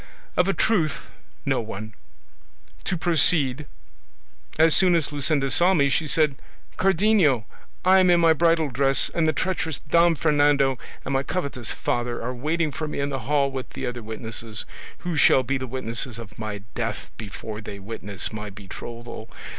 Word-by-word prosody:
Of 180 - +3
a 195 - +2
truth 165 - 0 0.3
no - - +1
one. 110 0 -7 0.9
To 185 - -1
proceed: 150 -4 +3 0.9
as 160 0 +5
soon 185 -2 +5
as 160 -3 0
Luscinda 145 -1 +1
saw 180 +6 +4
me 140 -3 +3
she 155 +3 0
said, 150 -3 +3 0.4
'Cardenio, 185 - +3 0.4
I 190 +1 +6
am 185 -1 +4
in 175 -1 +5
my 165 -1 +5
bridal 165 -1 +2
dress, 135 +2 +2
and 165 -2 +1
the - - +4
treacherous 160 -3 -2
Don 170 +1 +4
Fernando 145 -3 +2 0.3
and 135 - -2
my 135 - +2
covetous 140 -6 -2
father 120 0 -2
are 125 +2 -4
waiting 155 +5 -1
for 155 +2 -4
me 150 - -5
in 140 0 -1
the 135 -1 -3
hall 140 -2 +2
with 130 -1 -6
the - - -4
other 125 0 -4
witnesses, 110 0 -4 0.3
who 175 -2 -4
shall 135 -2 +5
be 135 +2 -1
the 130 - -5
witnesses 120 -1 -2
of 110 -2 -11
my 105 -2 -5
death 115 -2 -4
before 110 0 -7
they 105 -1 -8
witness 100 0 -5
my 105 -1 -5
betrothal. 115 +4 -9
140 Hz, 170 wpm, -24 LUFS, 115-160 Hz, 0.9 s, I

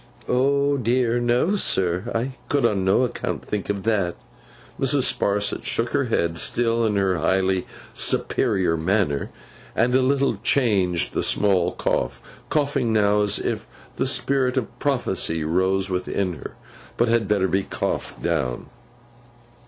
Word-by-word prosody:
'Oh, 140 +2 +2
dear 120 -1 +1
no, 120 +11 +2
sir, 95 - +1
I 120 +4 -1 0.2
could 140 -3 +2
on 100 -4 +1
no 95 +7 +3
account 125 - -3
think 105 -2 -4
of 100 -1 -2
that!' 100 -6 0 0.6
Mrs. - - +2
Sparsit 100 0 0
shook - - -1
her - - 0
head, 85 -1 0
still 115 -1 +2
in 105 - 0
her 95 -2 +1
highly 95 +3 +1 0.3
superior 90 -4 +1
manner, 80 -3 0 0.5
and 120 +2 +2
a 130 - +4
little 140 +1 +1
changed 95 - +1
the - - 0
small 95 -4 +1
cough—coughing 140 - -2
now, 105 -1 +3
as 105 -1 +2
if - - -3 0.3
the - - 0
spirit 135 -1 +1
of 120 -5 -3
prophecy 95 - -1
rose 95 +4 +1
within 90 0 -1
her, 80 - -9 0.4
but 120 - +3
had 115 -2 +2
better 100 -2 +2
be 95 +2 +1
coughed - - -4
down. 65 -8 -2
105 Hz, 140 wpm, -23 LUFS, 95-120 Hz, 0.6 s, a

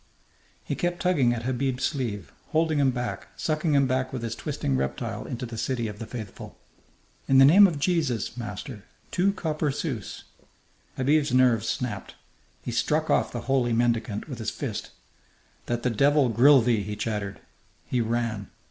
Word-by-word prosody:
He - - -3
kept 175 -2 -1
tugging 160 -10 +3
at 115 -1 -3
Habib's 130 +1 -1
sleeve, 105 - -2 0.2
holding 160 -1 +2
him 140 -2 +4
back, 125 -1 -4
sucking 155 -1 0
him 140 -1 +4
back 130 0 -1
with 125 -3 -5
his 115 -1 -2
twisting 70 -10 -2
reptile 65 0 -3
into 125 +1 -4
the 115 -1 -6
city 120 -2 -1
of 105 -1 -8
the 115 - -6
faithful. 110 -4 -8 0.7
"In 135 - +4
the 135 - +9
name 195 +8 +8
of 165 -5 -3
Jesus, 145 - 0
master, 110 0 -7 0.3
two 185 +2 +2
copper 155 -5 -2
sous!" 135 - -4 0.7
Habib's 145 +3 +2
nerves 120 -3 +3
snapped. 110 -6 -4 0.5
He - - -4
struck - - +1
off - - +2
the - - -4
holy 125 -2 +1
mendicant 115 -2 0
with 130 -6 -7
his 110 - -2
fist. - - -5 0.8
"That 120 0 -2
the 125 - +1
devil 140 +3 +3
grill 130 +4 +6
thee!" 115 -3 +2
he 105 +1 -5
chattered. 105 -3 -3 0.5
He 125 - 0
ran. 115 -3 -2
125 Hz, 165 wpm, -26 LUFS, 115-140 Hz, 0.8 s, the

